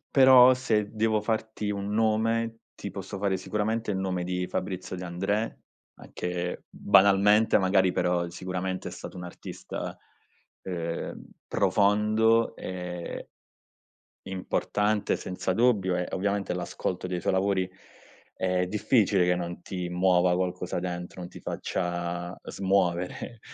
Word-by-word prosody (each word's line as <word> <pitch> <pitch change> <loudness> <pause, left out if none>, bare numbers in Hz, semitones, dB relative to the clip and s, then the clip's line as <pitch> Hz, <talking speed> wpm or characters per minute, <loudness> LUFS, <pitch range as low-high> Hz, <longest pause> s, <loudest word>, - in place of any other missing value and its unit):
però 130 -1 +8
se 110 -5 0
devo 110 0 +2
farti 110 -1 -2
un 100 0 -4
nome, 115 +1 +1 0.2
ti 100 - -6
posso 95 0 -6
fare 100 -1 +1
sicuramente 105 +4 -2
il 100 - 0
nome 95 -2 -1
di 90 0 -2
Fabrizio 95 0 -4
De 90 - -6
André, 95 +5 -2 0.4
anche, 90 0 -4
banalmente, 100 +3 +5
magari, 95 -1 +3
però, 90 -1 +1
sicuramente, 95 +1 -4
è - - -7
stato - - -8
un'artista, 90 -1 -7 0.6
ehm, 85 -3 -4 0.2
profondo 110 +3 +3
e 90 -1 -6 1.0
importante 105 +2 0
senza 95 0 -3
dubbio 100 -5 +3
e 90 - -1
ovviamente 100 0 -1
l'ascolto 90 +1 -3
dei 90 -1 -3
suoi - - +1
lavori 95 -1 +1 0.6
è 90 -1 0
difficile 105 -2 +3
che 90 0 +3
non 85 0 -5
ti 90 -1 -4
muova 90 0 +3
qualcosa 90 0 -2
dentro, 90 0 -5
non 90 - -7
ti - - -11
faccia 85 0 -3
smuovere 95 +3 -1
95 Hz, 120 wpm, -27 LUFS, 90-105 Hz, 1.0 s, però